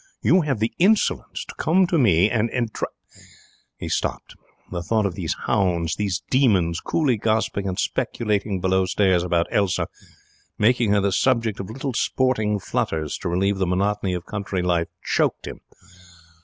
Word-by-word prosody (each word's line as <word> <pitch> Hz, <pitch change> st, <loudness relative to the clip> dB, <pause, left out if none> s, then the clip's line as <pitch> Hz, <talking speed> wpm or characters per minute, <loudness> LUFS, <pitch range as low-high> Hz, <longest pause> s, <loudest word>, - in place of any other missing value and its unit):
'You 185 Hz, -, +5 dB
have 140 Hz, -6 st, -1 dB
the 110 Hz, +2 st, -1 dB
insolence 205 Hz, +4 st, +1 dB
to -, -, -9 dB
come 185 Hz, +4 st, +3 dB
to 170 Hz, -2 st, +1 dB
me 95 Hz, -, +4 dB
and 115 Hz, 0 st, 0 dB, 0.7 s
' -, -, -25 dB
He -, -, -6 dB
stopped. -, -, -3 dB, 0.4 s
The 85 Hz, -1 st, -3 dB
thought 110 Hz, +4 st, 0 dB
of 95 Hz, -, -1 dB
these 85 Hz, -3 st, -3 dB
hounds, 90 Hz, -7 st, +1 dB
these 100 Hz, -3 st, -2 dB
demons, 95 Hz, -11 st, +3 dB
coolly 140 Hz, -8 st, 0 dB
gossiping 110 Hz, -2 st, 0 dB
and 90 Hz, -1 st, -3 dB
speculating 105 Hz, -3 st, -1 dB
below 95 Hz, 0 st, +2 dB
stairs 95 Hz, -1 st, +2 dB
about 85 Hz, -1 st, +1 dB
Elsa, 100 Hz, -4 st, +1 dB, 0.7 s
making 115 Hz, +1 st, +3 dB
her 100 Hz, -1 st, +3 dB
the 100 Hz, 0 st, +1 dB
subject 115 Hz, 0 st, +1 dB
of 95 Hz, -, -6 dB
little 130 Hz, +3 st, -4 dB
sporting 110 Hz, -4 st, +1 dB
flutters 80 Hz, -5 st, -2 dB
to 90 Hz, -, -3 dB
relieve 95 Hz, +3 st, 0 dB
the 95 Hz, -, +1 dB
monotony 95 Hz, +1 st, 0 dB
of 90 Hz, 0 st, -6 dB
country 100 Hz, -3 st, -3 dB
life, 85 Hz, -2 st, +1 dB, 0.2 s
choked -, -, 0 dB
him. -, -, -7 dB
100 Hz, 160 wpm, -23 LUFS, 90-115 Hz, 0.7 s, You